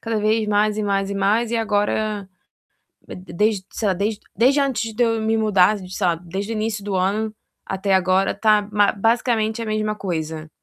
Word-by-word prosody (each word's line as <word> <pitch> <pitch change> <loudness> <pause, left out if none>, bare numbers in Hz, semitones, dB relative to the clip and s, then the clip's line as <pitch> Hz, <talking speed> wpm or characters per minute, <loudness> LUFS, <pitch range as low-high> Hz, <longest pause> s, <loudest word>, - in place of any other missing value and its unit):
cada 225 -1 -3
vez 215 +1 +1
mais 210 0 +1
e 215 - 0
mais 195 -1 0
e 200 - -3
mais. 210 +4 +1
E 235 - 0
agora 210 -1 -1 0.8
de - - -7
de 185 -1 -12
desde, 205 +1 0
sei 215 - -1
lá, - - +3
desde 205 +3 -2 0.2
desde 265 +7 +4
antes 235 -5 -1
de 245 - +1
eu 225 -1 +1
me 220 +1 +1
mudar, 210 -2 +3
sei 185 0 -3
lá, 175 - +3
desde 185 +6 -5
o - - -2
início 215 -1 -3
do 205 -2 -3
ano 210 +4 0 0.3
até 195 +1 -2
agora 190 +1 +2
tá 210 0 +3
ma 205 0 +3
basicamente 225 +1 0
a 230 - -4
mesma 215 0 -1
coisa. 160 -5 -4
210 Hz, 205 wpm, -21 LUFS, 195-220 Hz, 0.8 s, desde